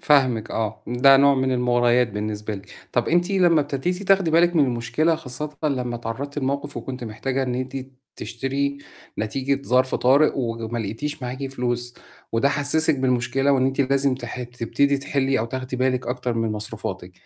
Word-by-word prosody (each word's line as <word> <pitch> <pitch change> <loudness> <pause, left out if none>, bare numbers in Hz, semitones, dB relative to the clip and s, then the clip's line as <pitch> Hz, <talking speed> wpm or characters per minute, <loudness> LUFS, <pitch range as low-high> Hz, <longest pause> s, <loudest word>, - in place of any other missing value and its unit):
فاهمِك 130 -7 +3
آه، 110 -2 -3
ده 125 +3 +6
نوع 140 0 +5
من 130 0 +1
المُغريات 120 -1 +3
بالنسبة 105 0 -4
لِك، 100 +1 -11 0.2
طَب 120 - +1
أنتِ 175 +3 +2
لمّا 175 -5 +4
ابتديتِ 160 +7 -2
تاخدي 195 -3 +3
بالِك 170 +1 +4
من 145 - +5
المشكلة 125 +7 +1
خاصةً 150 -1 -6
لمّا 125 -4 -1
اتعرضتِ 130 +6 -5
لموقف 140 +1 -2
وكنتِ 125 +1 -5
محتاجة 130 +5 -2
إن 125 -1 -2
أنت 130 +1 -4 0.4
تشتري 140 +3 -2 0.4
نتيجة 135 +5 -1
ظرف 130 0 +2
طارئ، 140 +5 +4
وما 115 -2 -3
لقيتيش 120 +8 -4
معاكِ 130 +2 -4
فلوس، 120 -2 -3 0.4
وده 115 +5 +3
حسِّسِك 150 +1 +1
بالمشكلة 130 +2 +1
وإن 130 -1 +3
أنتِ 135 +1 -1
لازم 135 0 +2
تح 125 0 -6
تبتدي 125 +4 0
تحلِّي 135 -1 0
أو 110 - 0
تاخدي 130 +1 -5
بالك 130 -1 0
أكتر 125 -1 -2
من 115 -1 -1
مصروفاتِك، 105 0 -5
130 Hz, 165 wpm, -23 LUFS, 120-140 Hz, 0.4 s, ده